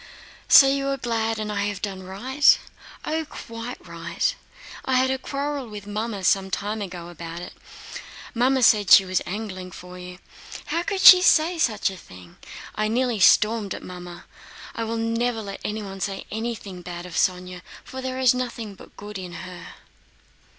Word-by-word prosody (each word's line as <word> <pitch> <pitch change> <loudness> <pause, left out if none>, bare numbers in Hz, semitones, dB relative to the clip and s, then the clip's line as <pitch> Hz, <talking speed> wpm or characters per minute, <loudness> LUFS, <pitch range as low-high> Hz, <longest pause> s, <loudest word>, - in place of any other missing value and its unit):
"So 275 - +9
you 275 0 0
are 275 0 0
glad 225 -3 -1
and 215 -1 -3
I 200 -1 -1
have 205 -2 -3
done 195 -2 -5
right?" 250 +10 +3 0.5
"Oh, 320 +1 -1
quite 230 -4 -8
right! - - -2 0.5
I 260 - 0
had 260 +1 +3
a 265 - -1
quarrel 280 0 -3
with 205 -2 -8
Mamma 210 -1 -4
some 190 +1 +2
time 210 +3 -3
ago 175 -3 -7
about 170 0 -8
it. 175 - -8 0.8
Mamma 255 +2 +2
said 210 -3 +5
she 195 - +9
was 185 -1 0
angling 185 -2 -5
for 180 0 -10
you. 180 0 -9 0.5
How 335 - -1
could 375 +3 -2
she 365 -1 +11
say 335 -1 +4
such 215 -8 +1
a 190 - -9
thing! 90 - -14 0.4
I 215 0 -1
nearly 240 0 0
stormed 210 +2 +4
at - - -9
Mamma. 175 -1 -9 0.5
I 230 - -3
will 230 +1 -3
never 230 +1 -1
let 200 -1 -7
anyone 205 -2 -5
say 195 0 -4
anything 220 -4 -5
bad 175 0 -7
of 180 - -10
Sónya, 180 0 -1 0.2
for 260 - -8
there 260 0 -4
is 255 -2 +4
nothing 240 -4 -4
but 190 - -16
good 205 -1 -7
in 180 -2 -8
her." 180 -2 -10
210 Hz, 175 wpm, -24 LUFS, 185-250 Hz, 0.8 s, she